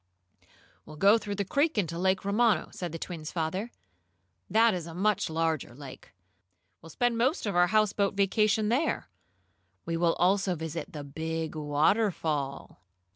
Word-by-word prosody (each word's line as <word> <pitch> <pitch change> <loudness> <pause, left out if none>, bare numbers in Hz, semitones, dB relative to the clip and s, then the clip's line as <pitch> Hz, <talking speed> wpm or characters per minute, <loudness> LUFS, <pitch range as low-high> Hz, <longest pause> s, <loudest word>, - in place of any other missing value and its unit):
"We'll 155 - -12
go 200 +8 +5
through 205 -2 -5
the 200 0 -2
creek 285 - +1
into 170 -4 -1
Lake 190 +1 +1
Romano," 210 -3 +2
said 175 -3 -5
the 165 - -5
twins' 160 -2 -6
father. 185 +7 -3 0.8
"That 225 0 +4
is 175 -3 -4
a 165 - -9
much 200 0 +1
larger 160 -6 -1
lake. 135 -1 -11 0.7
We'll 165 - -13
spend 240 +6 0
most 260 +7 +1
of 205 - -2
our 175 0 +5
houseboat 205 -1 +1
vacation 210 +2 +2
there. 280 +7 0 0.8
We 165 0 -2
will 165 0 +2
also 190 +1 +2
visit 160 0 -5
the 150 -2 -6
big 160 +3 -4
waterfall." 150 - 0
180 Hz, 150 wpm, -28 LUFS, 160-210 Hz, 0.8 s, go